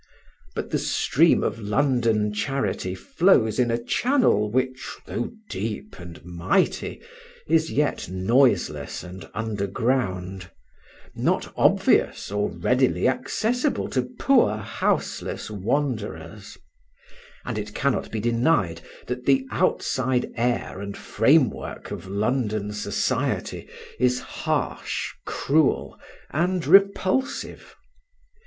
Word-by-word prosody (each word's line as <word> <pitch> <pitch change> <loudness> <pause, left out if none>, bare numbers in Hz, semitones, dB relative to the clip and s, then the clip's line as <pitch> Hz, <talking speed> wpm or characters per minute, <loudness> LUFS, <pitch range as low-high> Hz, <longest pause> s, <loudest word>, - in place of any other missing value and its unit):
But - - -4
the - - +1
stream - - +3
of 115 - -2
London 110 -1 +1
charity 105 -6 -2
flows 110 - +2
in 120 -1 +3
a 115 - +1
channel 175 - +2
which, 130 +2 -2
though - - -3 0.2
deep 105 +1 -5
and 85 -1 -11
mighty, 85 -1 0 0.5
is 160 0 +2
yet 145 - 0
noiseless 115 +8 +1
and 90 -2 -10
underground; 100 -3 -2 0.6
not - - -1
obvious - - +2
or 105 0 0
readily 125 +1 +1
accessible 225 - 0
to - - -1
poor 250 - +4
houseless 110 +1 -2
wanderers; 105 - -3 0.9
and 115 -3 -3
it 105 0 -7
cannot 140 -2 0
be 110 - -3
denied 115 - +1 0.2
that 125 0 -5
the 135 -1 +4
outside 130 -2 0
air 120 -5 -1
and 100 0 -6
framework - - +1
of - - -6
London 105 0 -1
society 105 - -2 0.3
is 125 0 +3
harsh, - - -2 0.2
cruel, 150 0 +1 0.3
and 175 +3 0
repulsive. 200 - +2
115 Hz, 100 wpm, -24 LUFS, 100-135 Hz, 0.9 s, poor